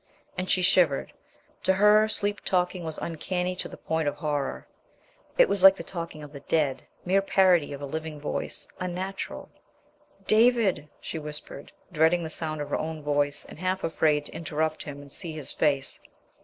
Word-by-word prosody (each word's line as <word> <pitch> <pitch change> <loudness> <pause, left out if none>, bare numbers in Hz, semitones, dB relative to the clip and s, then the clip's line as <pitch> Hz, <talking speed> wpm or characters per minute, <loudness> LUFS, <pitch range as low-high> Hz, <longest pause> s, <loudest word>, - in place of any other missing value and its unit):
And 185 0 -3
she 185 - +3
shivered. 175 -6 +3 0.5
To 190 - +3
her, 210 +2 +5
sleep 205 -1 0
talking 180 -1 0
was 160 -1 -4
uncanny 180 +2 -2
to - - -2
the - - -11
point 160 -1 -1
of 145 - 0
horror; 145 -4 -3 0.7
it - - +7
was 200 - 0
like 195 0 +9
the - - -7
talking 165 -4 -6
of 145 0 -11
the 140 - -8
dead, 145 -2 0 0.2
mere 190 +2 +3
parody 185 -6 +3
of 140 0 -6
a - - -2
living 155 +1 -5
voice, 145 - -3
unnatural. 185 +2 -4 0.8
"David!" 220 -8 +3
she 160 - -4
whispered, 150 -2 -8 0.2
dreading 160 +3 +3
the 160 - -5
sound 155 -2 -2
of 145 - -6
her - - 0
own 155 -1 -4
voice, 145 -1 +1
and - - -12
half 185 +1 -1
afraid 155 -2 +1
to - - -6
interrupt 155 -1 -2
him 145 -1 -6
and 140 -1 -14
see 170 0 -2
his 155 -3 -6
face. 140 -3 0
160 Hz, 180 wpm, -27 LUFS, 150-185 Hz, 0.8 s, like